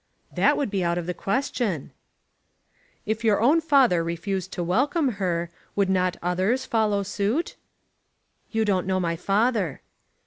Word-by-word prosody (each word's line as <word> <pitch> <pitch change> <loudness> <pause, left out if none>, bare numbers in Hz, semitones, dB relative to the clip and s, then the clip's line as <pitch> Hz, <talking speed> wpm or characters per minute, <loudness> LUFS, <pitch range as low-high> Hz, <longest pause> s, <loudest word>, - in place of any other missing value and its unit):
"That - - +3
would 275 -8 -1
be 195 -3 0
out 170 0 0
of 175 - -3
the 180 - -2
question." 200 - -2 1.1
"If 220 +2 -2
your 215 -3 +3
own 290 +9 +4
father 270 - +4
refused 180 +3 -3
to 175 - -2
welcome 265 - +1
her, 170 -2 -1 0.2
would 200 -2 +2
not 185 -1 +1
others 190 +9 0
follow 215 -5 +1
suit?" 205 - -1 0.9
"You 220 -1 0
don't 190 -3 0
know 190 0 +1
my 170 -2 -1
father." 200 - 0
200 Hz, 145 wpm, -25 LUFS, 180-235 Hz, 1.1 s, own